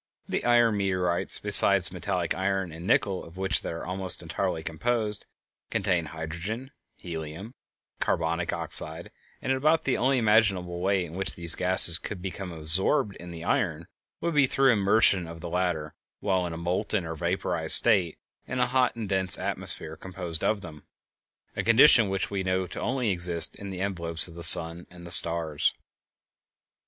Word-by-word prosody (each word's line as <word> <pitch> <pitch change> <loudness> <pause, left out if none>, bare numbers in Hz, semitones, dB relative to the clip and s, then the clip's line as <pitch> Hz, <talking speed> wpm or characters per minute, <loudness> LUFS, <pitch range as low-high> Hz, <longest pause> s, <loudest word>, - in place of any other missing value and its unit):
The - - -3
iron 120 -3 +2
meteorites, 90 -3 +1
besides - - +5
metallic 90 -4 -3
iron 95 -2 -2
and 85 +3 -9
nickel, 100 -4 0
of 85 +2 -14
which 95 0 +1
they - - -6
are 85 - -7
almost 95 0 -3
entirely 80 +1 -3
composed, 105 +5 -3 0.4
contain 85 -3 -1
hydrogen, 85 - -7 0.3
helium, 80 +1 -8
and 115 - -14 0.5
carbonic 85 +1 -1
oxide, - - -3 0.3
and - - -2
about 155 +5 +1
the 135 - -1
only 130 +2 +1
imaginable 105 -6 +1
way 95 0 0
in 80 - -12
which 95 +2 -2
these 85 -2 0
gases 90 -2 +4
could 105 - -7
have - - -14
become 95 -1 -6
absorbed 95 - +2
in 90 - -11
the 85 -1 -9
iron 85 -3 -2 0.4
would 170 0 -2
be 145 -3 +3
through 135 +1 +2
the - - +5
immersion 100 -3 +3
of 85 0 -10
the 85 - -7
latter 90 -4 -3 0.3
while 95 -3 -1
in 85 - -7
a - - -7
molten 90 +3 -2
or 80 - -5
vaporized 85 0 +2
state 95 -8 +2 0.3
in 125 - -5
a 125 - +3
hot 125 0 0
and 115 -3 -6
dense 95 -3 +1
atmosphere 80 - -4
composed 90 -1 -6
of 110 -2 0
them, 80 -5 -11 0.7
a - - -2
condition 115 -2 +5
which 95 0 -3
we 100 -1 -2
know 95 0 -1
to - - -9 0.2
exist 90 -6 +4
only - - -16
in 100 - -7
the 95 0 -4
envelopes 85 -5 -2
of 85 - -13
the 85 - -10
sun 85 +1 +6
and 90 -1 -14
the 85 - -7
stars. 85 -4 +1
90 Hz, 175 wpm, -26 LUFS, 85-100 Hz, 0.7 s, sun